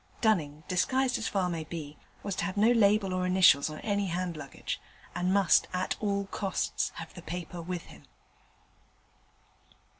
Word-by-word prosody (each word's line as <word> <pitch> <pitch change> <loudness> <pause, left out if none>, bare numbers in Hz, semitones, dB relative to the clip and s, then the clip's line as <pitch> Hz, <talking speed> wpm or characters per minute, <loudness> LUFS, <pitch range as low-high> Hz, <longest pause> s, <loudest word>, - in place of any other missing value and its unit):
Dunning, 155 -9 +1
disguised 255 +7 +1
as 225 - -2
far 195 -2 0
as 180 - -1
might 160 -2 -4
be, 155 -3 -6 0.3
was 200 -2 -2
to - - 0
have 195 +1 -4
no 220 +3 +5
label 205 -4 +4
or 185 0 0
initials 180 -6 +5
on 155 - -7
any 205 -2 0
hand 175 0 -2
luggage, 145 -3 -6 0.3
and 180 +1 0
must 195 -3 +4
at 180 0 -1
all 200 -1 0
costs 195 -1 -2
have - - -8
the - - -10
paper 175 0 -6
with 175 0 -4
him. - - -15
185 Hz, 170 wpm, -30 LUFS, 170-200 Hz, 0.3 s, no